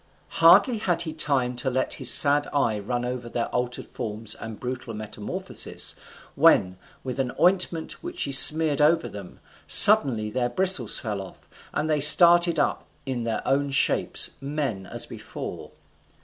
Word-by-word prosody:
Hardly 200 +8 +4
had 175 -4 -2
he 160 -2 -7
time 135 -5 -2
to 130 +2 -3
let 130 +1 -3
his 130 - +3
sad 145 0 +3
eye 115 -7 -1
run 120 +4 -5
over 125 -1 -7
their 115 0 -4
altered 125 0 -5
forms 110 0 -6
and 110 -1 -10
brutal 125 -2 -7
metamorphosis, 105 -1 -4 0.4
when, 90 -1 +2 0.3
with 130 0 -7
an 130 -2 -3
ointment 180 -2 -1
which 350 +1 -8
she - - -3
smeared 150 +2 +5
over 160 +2 +1
them, 100 -3 -12 0.3
suddenly 135 - +6
their 125 +1 -3
bristles 150 - -2
fell 105 -3 -6
off, 95 - -15 0.2
and 155 - -3
they 155 -2 -1
started 170 +2 +7
up 145 - -2 0.2
in 125 -3 -5
their 115 - -5
own 140 +1 -1
shapes, 135 - +1
men 135 -9 -5
as - - -1
before. - - -10
135 Hz, 155 wpm, -23 LUFS, 115-160 Hz, 0.4 s, started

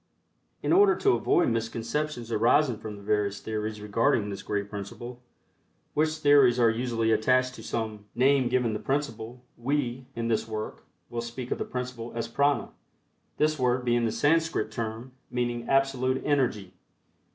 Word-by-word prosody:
In - - +2
order 395 0 +6
to 400 - +3
avoid 175 - +2
misconceptions 115 +3 -2
arising 120 +2 +3
from 110 -1 -7
the 100 - -12
various 105 -1 0
theories 110 -1 -4
regarding 105 0 +1
this 100 - -6
great 100 -1 -2
principle, 110 +5 -7 0.7
which 155 +1 +1
theories 145 -5 +5
are 115 -2 +5
usually 115 -1 0
attached 125 +3 +2
to 115 - -10
some 110 -2 -4
name 130 0 +3
given 125 -3 +1
the 105 - -2
principle, 125 -4 -3 0.2
we, 130 -1 -1
in 115 0 -2
this 110 -1 0
work, 110 -1 -5 0.3
will 120 0 -2
speak 120 +1 -7
of - - -1
the - - -2
principle 125 -2 -5
as 115 0 -2
"Prana," 140 +4 +1 0.7
this 155 -1 +1
word 125 0 +1
being 120 -1 +2
the 115 - 0
Sanskrit 160 -6 +1
term 115 +3 -5 0.2
meaning 120 -1 -2
"Absolute 135 -1 +1
Energy." 125 -10 0
120 Hz, 155 wpm, -27 LUFS, 110-130 Hz, 0.7 s, order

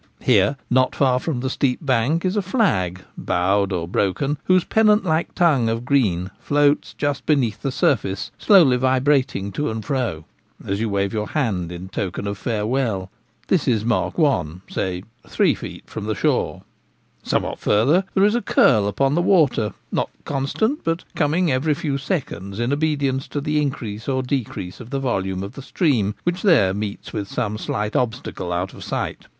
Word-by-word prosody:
Here, 110 +1 +3
not 130 0 +2
far 130 -2 +3
from 130 -4 -3
the 130 - -1
steep 130 -2 +1
bank, 135 +7 +1
is 185 +2 0
a 205 - +2
flag, 105 - 0
bowed 100 +2 +1
or 85 -3 -2
broken, 135 - 0
whose 185 -1 +4
pennant 215 -1 +3
like 160 -1 0
tongue 145 -10 +3
of 115 +1 -2
green 100 -10 +1
floats 145 0 +1
just 145 -1 -2
beneath 125 -8 +1
the 135 - -1
surface, 100 -7 0
slowly 165 -12 +6
vibrating 130 -5 +1
to 150 +9 -2
and 110 -1 -5
fro, 110 - -2 0.4
as 100 +1 -2
you 115 - 0
wave 100 +1 -1
your 105 -1 -2
hand 95 - -1
in 90 +1 -7
token 95 +1 -4
of 100 -1 -4
farewell. 110 -4 -1 0.4
This 180 -6 +1
is 110 -4 +1
mark 120 -1 0
one 90 - +1
— - - -37
say 90 -1 -2 0.2
three - - +2
feet - - -8
from 110 - -6
the 110 0 -1
shore. - - 0 0.6
Somewhat - - -1
farther 140 - +3
there 195 - +4
is 210 - +3
a 240 - +1
curl 110 - +4
upon 135 +7 +1
the 170 - +2
water, 145 - +3 0.2
not - - 0 0.2
constant, 180 - -1
but 165 +1 -1
coming 160 +2 +1
every 145 +4 +1
few 140 -3 -2
seconds 125 - -4
in 120 +3 0
obedience 145 -3 0
to 145 - -3
the 150 +1 0
increase 115 -5 -4
or 130 -1 0
decrease 125 -8 -4
of 120 -2 -10
the 135 0 -2
volume 95 -7 -1
of 100 - -7
the 135 - -9
stream, 125 - 0
which 175 +1 -1
there 145 - +4
meets 105 0 -5
with 105 -3 -3
some 105 +1 -2
slight 105 0 -3
obstacle 115 -7 -2
out 90 +2 -2
of - - -10
sight. - - -4
125 Hz, 180 wpm, -22 LUFS, 100-145 Hz, 0.6 s, slowly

